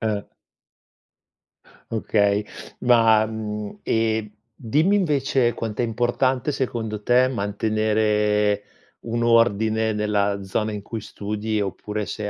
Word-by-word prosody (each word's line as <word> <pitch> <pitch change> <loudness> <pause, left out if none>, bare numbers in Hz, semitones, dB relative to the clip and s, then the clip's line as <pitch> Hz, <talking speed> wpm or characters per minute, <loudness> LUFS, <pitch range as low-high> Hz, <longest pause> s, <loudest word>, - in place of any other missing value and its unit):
Eh. 105 -3 -2 1.6
Okay. 105 -2 +1 0.3
Ma 115 -3 +5
mhmm, 105 -1 -5
e 110 -1 0 0.2
dimmi 155 - +1
invece 135 -8 +1
quant'è 110 +1 -3
importante, 120 +4 0
secondo 115 -6 -3
te, 125 +3 +3
mantenere 105 -1 +1 0.4
un 115 +1 -1
ordine 110 -1 +3
nella 100 -1 0
zona 105 +3 -2
in 105 - -5
cui 110 +2 -6
studi, 105 +1 -3
oppure, 105 +2 -4
se 105 -1 -4
110 Hz, 105 wpm, -23 LUFS, 105-115 Hz, 1.6 s, Ma